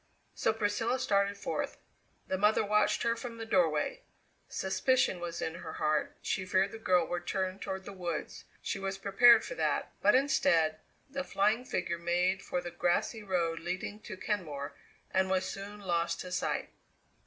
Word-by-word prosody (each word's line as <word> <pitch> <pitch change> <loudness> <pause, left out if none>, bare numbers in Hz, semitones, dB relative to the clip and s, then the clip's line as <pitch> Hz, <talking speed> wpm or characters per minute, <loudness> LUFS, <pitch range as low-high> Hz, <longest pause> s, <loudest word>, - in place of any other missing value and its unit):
So - - +1
Priscilla 220 +3 0
started 200 -4 +1
forth. - - -3 0.5
The - - -1
mother 210 +2 +3
watched 210 +1 +2
her 230 0 +2
from 235 0 -7
the 225 - -5
doorway. 275 - +1 0.5
Suspicion 190 0 +1
was 170 -1 -4
in 160 - -2
her 170 - -7
heart; 155 -1 0
she 195 - -1
feared 190 +1 +2
the 225 - -8
girl 180 -5 +3
would 175 0 -4
turn 190 0 -1
toward 190 -1 -5
the 200 - -7
woods; 180 -3 -4 0.2
she 200 - -2
was 195 0 -3
prepared 220 +4 +6
for - - -5
that, - - 0
but - - +5
instead, 165 - +3 0.3
the 275 0 -3
flying 215 +2 +1
figure 170 -8 -2
made 180 +3 +1
for 180 - -2
the 175 - -6
grassy 175 +6 0
road 170 -5 0
leading 185 +4 -4
to 210 -3 -8
Kenmore 155 -9 -3 0.4
and 190 0 +2
was 190 0 +1
soon 200 +2 -6
lost 170 -3 0
to 180 - -7
sight. - - -1
190 Hz, 170 wpm, -31 LUFS, 175-215 Hz, 0.5 s, prepared